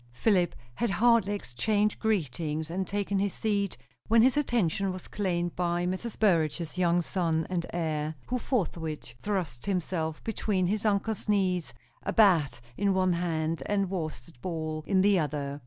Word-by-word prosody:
Philip 180 - +2 0.2
had 235 - -1
hardly 225 -1 +3
exchanged 205 - 0
greetings 160 - -1
and 190 +1 -2
taken 200 -1 -1
his 200 -1 0
seat, 200 -3 0 0.3
when 225 +1 +6
his 260 +2 +4
attention 200 - +1
was 185 -1 -8
claimed 175 -4 -1
by 175 0 0
Mrs. 185 +5 -3
Burrage's 165 -5 +1
young 175 -1 +2
son 165 -3 0
and 170 -2 -1
heir, 155 -2 -2
who 250 0 -1
forthwith 165 - -2
thrust 180 -10 -3
himself 165 -4 -2
between 205 -4 0
his 210 +4 0
uncle's 210 +1 -1
knees, 185 -4 +1 0.3
a - - -3
bat 170 - +4 0.2
in 200 -1 +2
one 185 -1 +3
hand, 165 -2 -1
a 205 - +2
worsted 160 -8 -5
ball 155 -3 -3
in 190 -2 +3
the 200 -1 +4
other. 145 -2 -2
180 Hz, 155 wpm, -29 LUFS, 160-205 Hz, 0.3 s, when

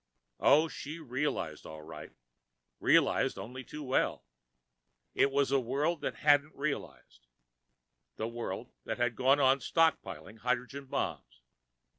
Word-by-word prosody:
Oh, 155 +3 +5
she 155 0 -7
realized, 130 - -3
all 80 0 -9
right, 80 - -9 0.7
realized - - +3
only 125 +7 -7
too 150 +3 -8
well. 130 -1 0 0.9
It 140 - +3
was 140 0 +1
the 135 0 +3
world 145 +7 -1
that - - -2
hadn't 145 +1 +4
realized. 140 - -5 0.9
The 110 - -3
world 115 0 -5
that - - -3
had 120 -1 0
gone 135 +3 +4
on 135 0 +4
stockpiling 160 -7 0
hydrogen 125 +3 -2
bombs. - - -4
130 Hz, 125 wpm, -31 LUFS, 120-145 Hz, 0.9 s, Oh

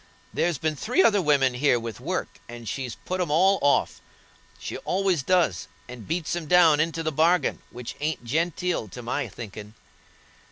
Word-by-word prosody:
There's 170 -3 0
been 155 +2 -1
three 245 - +2
other 205 - +4
women 140 -5 +3
here 125 -1 +2
with 115 -2 -7
work, 175 +9 -4
and 120 -1 -9
she's 125 +1 -4
put 185 0 -2
'em 175 - -1
all 190 +5 +4
off. 145 0 +2 0.6
She - - -6
always 190 -4 0
does, 165 - +1 0.2
and 125 -3 -10
beats 165 -1 -2
'em 170 -3 -5
down 165 -3 +5
into 165 +1 0
the 155 - -1
bargain, 165 +4 +2
which 120 -1 -7
ain't 150 -3 -2
genteel 165 0 -1
to 125 +5 -9
my 125 +3 -2
thinkin'." 110 0 -9
150 Hz, 170 wpm, -25 LUFS, 125-175 Hz, 0.6 s, down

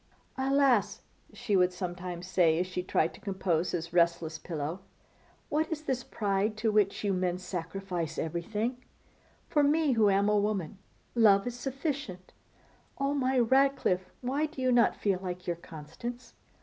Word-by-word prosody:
'Alas!' 265 -7 +2 0.3
she 210 - -1
would 180 -1 +4
sometimes 180 -1 -5
say 175 -3 +3
as 180 - +1
she 185 0 -3
tried 165 -2 0
to - - -13
compose 185 -4 0
his 170 -1 -4
restless 170 -2 +2
pillow; 160 +1 -4 0.7
'what 315 +2 0
is 310 -1 -3
this 260 -4 -2
pride 205 +1 -1
to 220 0 +1
which 210 -1 +2
you 200 -1 +1
men 180 -1 0
sacrifice 180 -2 -4
everything? 210 +9 -2 0.7
For 295 - +2
me, 295 +1 +3
who 220 -4 +4
am 200 +1 +3
a 210 - +3
woman, 200 -3 -2 0.3
love 205 -4 +5
is 245 - -3
sufficient. 270 - -4 0.6
Oh! 275 +1 0
my 265 -2 +1
Ratcliffe, 250 -7 +2
why 275 +5 0
do 300 -3 -12
you 255 -1 +2
not 240 -1 +4
feel 195 -3 0
like 180 -1 -5
your 175 - -1
Constance? 170 +11 -8
200 Hz, 155 wpm, -30 LUFS, 180-250 Hz, 0.7 s, love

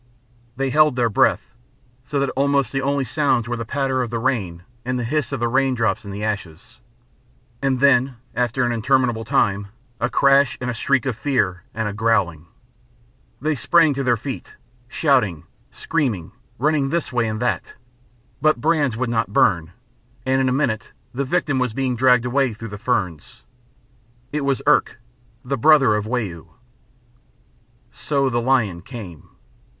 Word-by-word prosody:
They 135 0 -1
held 150 -2 +4
their 120 -2 +1
breath, - - +1 0.5
so 145 +1 -2
that 140 - 0
almost 140 0 +1
the 135 - -1
only 140 0 0
sounds 135 -3 +1
were 120 - -2
the 115 -1 -5
patter 135 0 0
of 120 - -2
the 120 - -3
rain 100 -9 -2 0.2
and 125 +1 -2
the 125 - -2
hiss 145 +4 -1
of 140 - -3
the 120 - +1
raindrops 125 -3 +1
in 100 - -9
the 100 +2 -5
ashes. 100 -2 -5 0.8
And 135 -2 +1
then, 135 -2 +4 0.2
after 125 +1 0
an 120 - +1
interminable 120 -1 +1
time, 100 -5 +1 0.3
a 120 +1 0
crash, 135 +1 +3
and 125 0 -2
a - - -4
shriek 130 +2 +1
of 130 -4 -1
fear, 100 - -1
and 110 -1 -1
a 105 - -3
growling. 100 -7 0 0.9
They 155 +2 0
sprang 160 +3 +3
to 135 0 -3
their 120 -2 +2
feet, 130 +4 -7 0.3
shouting, 120 - +1 0.3
screaming, 120 - -2 0.3
running 145 0 +1
this 165 -3 -2
way 120 -2 +1
and 110 0 -3
that, 120 +1 -2 0.7
but 155 -3 +3
brands 145 -5 +1
would 130 +1 -1
not 115 -3 0
burn, 85 -5 +2 0.5
and 130 0 +2
in 130 - +2
a - - 0
minute 125 -5 -1 0.2
the 140 +3 -2
victim 145 -2 0
was 125 -3 -1
being 130 -2 -1
dragged 125 0 +4
away 125 -2 +1
through 115 +1 -8
the 105 0 -8
ferns. 95 - -3 0.9
It 150 - -2
was 140 -1 0
Irk, 150 -4 +3 0.5
the 135 0 -2
brother 140 -4 +5
of 105 0 -2
Wau. 105 -9 -4 1.4
So 140 -3 -1
the 120 0 0
lion 115 -9 +1
came. 95 - -10
125 Hz, 165 wpm, -21 LUFS, 110-140 Hz, 1.4 s, brother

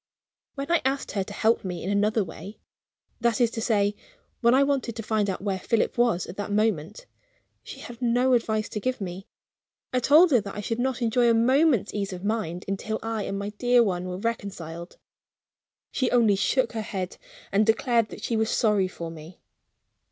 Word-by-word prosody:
When 280 +3 -4
I 340 - +3
asked 270 +1 -1
her 195 - -1
to 195 - -11
help 220 +2 +1
me 180 -3 -5
in 190 - -2
another 210 +2 +2
way 200 +3 -10 0.6
that 235 -2 +1
is 235 -2 +3
to 225 - -4
say, 205 -3 +1 0.4
when 235 +1 +4
I 275 - +5
wanted 275 -5 -1
to 225 - -5
find 210 -2 0
out 190 - -4
where 195 -2 -1
Philip 225 +4 0
was 235 -7 +2
at 180 - -10
that 205 0 -4
moment 210 - -1 0.6
she - - -10
had 240 0 -10
no 245 +2 +2
advice 220 -2 +1
to 210 - -4
give 255 +4 -2
me. 190 0 -6 0.7
I 255 - +3
told 305 +7 +6
her 245 -5 +5
that 200 -1 -8
I - - -5
should 225 +3 -3
not 255 0 -1
enjoy 235 +1 +3
a 230 - +4
moment's 255 - +3
ease 200 -2 -3
of 185 +2 -7
mind 190 -5 -2
until 195 +3 -2
I 225 -2 -2
and 195 - -3
my 200 +1 -3
dear 245 -1 +4
one 180 -4 -1
were 180 0 -4
reconciled. 185 -6 -5 0.9
She 255 -3 0
only 230 -5 +4
shook 245 +5 +1
her 225 - -3
head 190 -4 -5 0.3
and 200 +2 +3
declared 230 0 +2
that - - -10
she 235 - -1
was 220 0 +1
sorry 210 -5 +2
for 170 -2 -7
me. 165 +2 -12
220 Hz, 200 wpm, -26 LUFS, 195-240 Hz, 0.9 s, told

